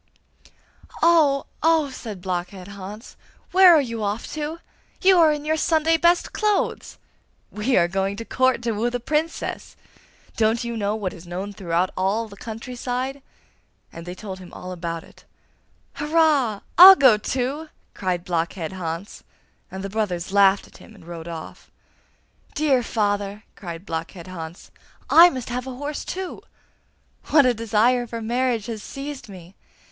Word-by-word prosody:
'Oh, 310 -5 +4 0.2
oh!' 320 -3 +3
said 215 -8 -8
Blockhead 185 +1 -4
Hans. 200 +4 -9 0.4
'Where 370 -2 +8
are 305 - +5
you 230 -4 -5
off 205 +2 -2
to? 305 +1 -4 0.4
You 375 -1 +5
are 320 -2 +6
in 295 0 -3
your 315 +1 +1
Sunday 320 0 +2
best 345 +2 +2
clothes!' 425 -2 -1 0.5
'We 230 +5 0
are 170 - +4
going 195 +2 -1
to 230 +2 -7
Court, 255 -1 +1
to 235 - 0
woo 225 +3 0
the 245 0 -3
Princess! 305 +6 -3 0.6
Don't 225 +1 +1
you 235 0 -4
know 210 -1 -1
what 200 -4 -3
is 175 0 -13
known 190 +4 -5
throughout 180 -1 -1
all 200 +5 0
the 200 - -13
country 225 +4 -8
side?' 255 +3 -3 0.7
And 165 +1 -10
they 180 - -6
told 190 -1 -8
him 180 -1 -12
all 180 - -8
about 170 -2 -5
it. - - -19 0.7
'Hurrah! 295 -8 +2 0.2
I'll 380 +2 +12
go 260 - +6
to!' 265 +8 -3 0.2
cried 180 -2 -2
Blockhead 170 0 -2
Hans; 175 +1 -6 0.5
and 190 0 -7
the - - -3
brothers 190 -5 -2
laughed 200 0 +4
at - - -17
him 220 - -16
and 185 -5 -16
rode 170 -1 -8
off. 165 -2 -9 0.9
'Dear 285 -4 +2
father!' 205 -2 -2
cried 170 -1 -8
Blockhead 165 +1 -5
Hans, 170 -2 -9 0.4
'I 345 +2 +9
must 255 -6 -6
have 250 +1 -4
a 260 - -6
horse 290 +3 -5
too. 375 0 -6 0.8
What 295 -3 +5
a 250 - +4
desire 230 +2 +1
for 230 0 -5
marriage 235 -1 -1
has 225 -3 -5
seized 275 -2 -7
me! 180 -2 -12
225 Hz, 160 wpm, -23 LUFS, 190-275 Hz, 0.9 s, I'll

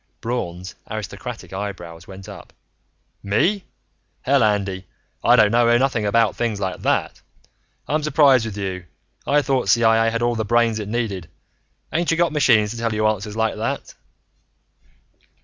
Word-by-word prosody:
Braun's 90 -7 -4 0.2
aristocratic 110 -4 -7
eyebrows 90 -4 -6
went 95 0 -11
up. 105 - -11 0.7
"Me? 175 - +1 0.6
Hell, 135 -1 +3
Andy, 100 -3 -1 0.4
I - - +6
don't 105 -1 +5
know 120 0 +4
nothing 120 -5 0
about 115 +1 +2
things 115 -4 -2
like 95 -2 -3
that. - - -1 0.7
I'm 155 +2 0
surprised 140 -5 +4
with 105 -2 -7
you. 95 -3 -4 0.4
I 145 +1 +3
thought 130 -7 0
CIA 115 +1 +4
had 115 +1 -2
all 120 0 +2
the 110 -1 -2
brains 115 0 +2
it 105 -1 -5
needed 105 -7 -3 0.6
ain't 170 +2 0
you 165 - +2
got 170 0 +2
machines 115 -8 +3
to 120 - -6
tell 115 -1 -1
you 110 0 0
answers 105 0 -1
like 110 0 0
that?" - - -4
110 Hz, 150 wpm, -21 LUFS, 100-120 Hz, 0.7 s, I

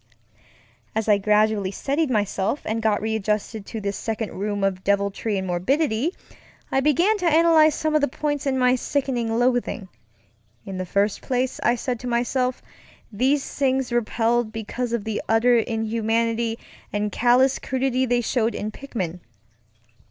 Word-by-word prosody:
As 220 0 -1
I 205 -2 +4
gradually 210 -1 +2
steadied 280 +9 -1
myself 210 +2 0
and 225 +1 -1
got 215 -1 +1
readjusted 215 -1 -2
to 225 - -5
this 200 -1 -3
second 220 -1 -3
room 205 0 -2
of 190 -1 0
deviltry 200 +1 0
and 190 - -2
morbidity, 245 - 0 0.6
I 270 - +2
began 340 - +3
to 360 - 0
analyze 320 -1 +5
some 310 -1 -1
of 305 - +3
the 285 - +3
points 290 +2 -2
in 265 -1 +1
my 250 -1 +4
sickening 245 -3 -1
loathing. 245 -4 0 0.8
In 190 -1 -6
the 185 - -4
first 200 +2 0
place, 255 0 -1
I 240 - +3
said 245 0 -3
to 250 - -6
myself, 245 +1 0 0.5
these 265 +6 +1
things 265 -2 0
repelled 235 0 +1
because 225 +2 -4
of 235 -3 -1
the 220 -1 -3
utter 235 +2 +4
inhumanity 225 0 0 0.3
and 205 0 -1
callous 250 +5 +3
cruelty 260 -1 0
they 245 0 +2
showed 235 -1 0
in 215 +1 -3
Pickman. 190 -10 -5
230 Hz, 150 wpm, -23 LUFS, 210-260 Hz, 0.8 s, analyze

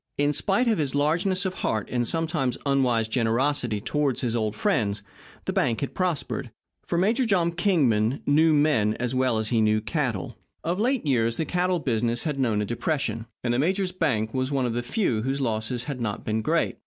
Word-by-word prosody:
In 145 +1 +2
spite 200 - +2
of 220 -5 +2
his 140 -3 0
largeness 180 +6 +1
of 185 - -1
heart 110 - -2
and 120 -1 0
sometimes 160 -6 -1
unwise 125 -5 +2
generosity 120 0 +1
toward 145 +2 0
his 120 -2 -1
old 110 -2 -1
friends, 105 - 0 0.4
the - - -2
bank 115 - +1
had 140 - -3
prospered, 165 -7 -2 0.3
for 170 - -2
Major 220 +9 +2
Tom 175 -5 +2
Kingman 140 - +1
knew 155 +3 +4
men 145 -9 +3
as 125 +1 -2
well 130 -3 +1
as 110 -1 -2
he 115 -2 +2
knew 110 0 +3
cattle. 115 - -2 0.3
Of 175 +4 -1
late 250 -2 +1
years 115 -5 +1
the 160 - -1
cattle 180 +1 +1
business 120 -5 -1
had 150 -4 -2
known 110 -5 +1
a - - -2
depression, 120 -1 -2 0.2
and 120 -1 +1
the 120 - +1
major's 185 +5 +1
bank 110 -11 -1
was 130 +1 -1
one 135 -2 +1
of 120 - -1
the 120 - -1
few 120 - 0
whose 135 +4 -1
losses 115 -1 -2
had 130 -1 -5
not 105 -3 -3
been 110 0 0
great. - - 0
130 Hz, 200 wpm, -25 LUFS, 115-165 Hz, 0.4 s, knew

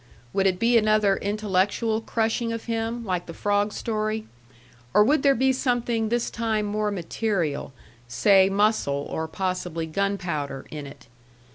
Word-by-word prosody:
Would 195 0 +2
it 185 -1 +1
be 230 +3 +4
another 215 -2 +3
intellectual 210 +2 0
crushing 230 +1 -1
of 230 0 -5
him, 230 0 -2
like 180 -3 -2
the 165 - -8
frog 205 0 +1
story, 215 0 -2 0.7
or 210 - +7
would 280 +6 +3
there 275 -1 +4
be 265 +2 +3
something 240 -4 0
this 240 0 0
time 220 -2 -1
more 210 0 -1
material 175 -6 -2 0.4
say 190 - +4
muscle, 195 -9 +1
or 160 0 -2
possibly 180 -2 -3
gunpowder 160 -6 -2
in 150 -2 -6
it? 140 - -13
210 Hz, 145 wpm, -25 LUFS, 185-225 Hz, 0.7 s, or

